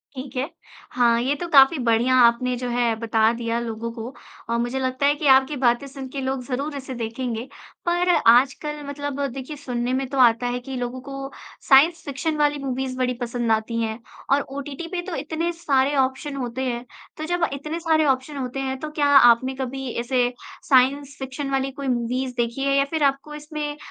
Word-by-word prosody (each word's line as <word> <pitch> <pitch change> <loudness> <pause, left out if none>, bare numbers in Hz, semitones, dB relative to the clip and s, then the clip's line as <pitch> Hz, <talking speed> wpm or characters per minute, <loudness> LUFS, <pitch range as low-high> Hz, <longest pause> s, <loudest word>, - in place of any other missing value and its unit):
ठीक 260 +1 -8
है। 265 +6 -1 0.4
हाँ, 235 -2 +3
ये 275 +4 0
तो 345 +4 -5
काफ़ी 275 +2 +7
बढ़िया 240 +1 +2
आपने 245 +1 +4
जो 250 0 -4
है 240 -2 +1
बता 225 -1 +2
दिया 230 0 -2
लोगों 230 0 -4
को, 230 +2 -7 0.4
और 235 - +1
मुझे 240 +3 -1
लगता 260 +1 -1
है 290 - +4
कि 295 0 -2
आपकी 265 +2 +5
बातें 240 +3 +3
सुन 270 -1 -8
के 275 0 -5
लोग 265 -1 -2
ज़रूर 280 +3 -3
इसे 265 -1 -6
देखेंगे। 235 +1 -4 0.4
पर 350 +1 +1 0.2
आजकल 280 +4 +2
मतलब 285 -1 -5
देखिए, 270 +3 -6
सुनने 250 -2 -3
में 265 +1 0
तो 275 - -4
आता 240 0 +5
है 245 0 -2
कि 265 +2 -7
लोगों 245 +1 -4
को 275 +1 -8 0.5
साइंस 315 +5 +6
फ़िक्शन 300 +3 -2
वाली 295 0 +2
मूवीज़ 260 -1 -3
बड़ी 250 -1 0
पसंद 240 -1 -1
आती 225 +1 0
हैं 220 +1 -3 0.3
और 285 - +3
ओटीटी 280 +4 -7
पे 360 -2 -2
तो - - -3
इतने 320 +3 -2
सारे 285 -4 +1
ऑप्शन 265 +2 0
होते 255 -1 -4
हैं। 240 -1 -3 0.3
तो 310 - -4
जब 350 +1 +1
इतने 305 +4 -4
सारे 320 -2 +2
ऑप्शन 270 +2 0
होते 260 0 -4
हैं, 265 0 -2
तो 310 - -5
क्या 295 -1 +1
आपने 250 +1 +5
कभी 265 0 -4
ऐसे 245 0 +1 0.4
साइंस 275 +2 +3
फ़िक्शन 270 +1 -5
वाली 270 0 0
कोई 280 0 -6
मूवीज़ 250 +1 -1
देखी 235 +3 -1
है 275 0 +2
या 275 - +3
फिर 315 -1 -1
आपको 275 +2 0
इसमें 300 0 -5
265 Hz, 200 wpm, -23 LUFS, 245-285 Hz, 0.5 s, काफ़ी